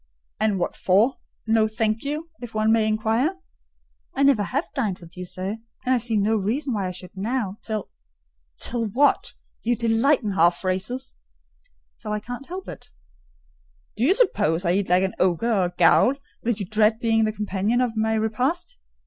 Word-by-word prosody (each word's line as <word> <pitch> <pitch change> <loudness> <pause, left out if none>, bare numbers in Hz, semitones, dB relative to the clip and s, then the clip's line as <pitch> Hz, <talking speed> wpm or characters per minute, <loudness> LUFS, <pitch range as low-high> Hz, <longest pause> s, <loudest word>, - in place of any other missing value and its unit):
"And 215 -2 +1
what 175 - -2
for, 210 +8 +3 0.3
'no, 220 -1 +3
thank 220 0 -1
you?' 305 +4 -4
if 235 -2 -8
one 215 0 +2
may 225 -1 +3
inquire." 225 - +1 0.8
"I 275 - +2
never 275 -6 +5
have 255 +7 -1
dined 215 -9 -1
with 170 -2 -15
you, 180 0 -6
sir: 185 +4 -4 0.3
and 255 - +3
I 250 - +3
see 225 -1 -1
no 215 +2 +2
reason 245 +7 -1
why 200 -3 -1
I - - -3
should 180 +1 -11
now: 210 0 -2
till—" 215 -1 -4 0.7
"Till 230 -2 0
what? 270 +8 +2 0.3
You 240 +1 +1
delight 235 +5 +2
in 210 - -1
half 175 -2 +4
phrases." 195 +8 -3 0.9
"Till 210 - -4
I 210 - -1
can't 245 +5 -8
help 370 +2 -7
it." - - -10 1.1
"Do 220 - -2
you 345 +9 +4
suppose 205 - +2
I 170 - +3
eat 195 0 0
like 180 +1 +4
an 190 - -1
ogre 190 +6 +2
or 190 -4 +2
a - - -1
ghoul, 265 - +5 0.3
that 230 -2 -1
you 200 - -2
dread 215 +3 +2
being 225 -1 +2
the 215 - 0
companion 210 +2 -1
of 245 -3 0
my 220 0 +1
repast?" 255 - -1
220 Hz, 185 wpm, -24 LUFS, 200-245 Hz, 1.1 s, never